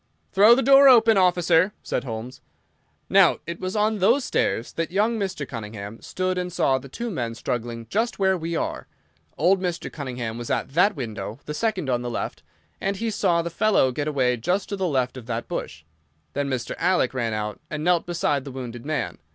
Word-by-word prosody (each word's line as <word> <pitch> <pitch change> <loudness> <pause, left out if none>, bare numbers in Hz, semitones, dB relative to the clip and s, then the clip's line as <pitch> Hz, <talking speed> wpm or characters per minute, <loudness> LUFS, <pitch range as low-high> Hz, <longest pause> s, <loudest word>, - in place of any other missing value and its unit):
"Throw 210 +5 +7
the 270 - +1
door 275 +2 +8
open, 225 -3 +6
officer," 180 0 +3
said 125 - -2
Holmes. 120 +2 -6 0.7
"Now, - - +5
it 170 +1 -6
was 185 +1 -4
on 215 0 +1
those 235 +8 +3
stairs 115 - -1
that 165 0 -2
young 215 +5 +1
Mr. 190 -8 -3
Cunningham 105 -1 -7
stood 185 0 -2
and 180 0 -3
saw 135 -6 +2
the 135 +1 -12
two 235 - -5
men 120 - -3
struggling 115 -1 -4
just 225 - -1
where 190 -1 +3
we 165 -1 -3
are. - - -3 0.5
Old 180 +6 +3
Mr. 175 -2 -3
Cunningham 125 -6 -5
was 120 - -6
at - - -1
that 190 +5 +4
window—the 110 +1 -6
second 190 -3 -1
on 120 -2 0
the 120 - -4
left—and 80 - -5
he 230 +2 -2
saw 175 -5 +1
the 170 - -4
fellow 180 -8 +3
get 145 +4 -3
away 130 -4 +1
just 180 - -1
to 200 - -2
the 190 -2 -1
left 130 -4 0
of 120 -3 -10
that 115 -1 -3
bush. 75 - -5 0.5
Then 140 0 -1
Mr. 125 -3 -3
Alec 180 -5 +2
ran 120 -4 -1
out 105 -1 -4
and 155 0 -4
knelt 175 0 +2
beside 150 -5 0
the 140 - -8
wounded 120 -2 -7
man. 155 +1 -3
155 Hz, 195 wpm, -24 LUFS, 120-190 Hz, 0.7 s, door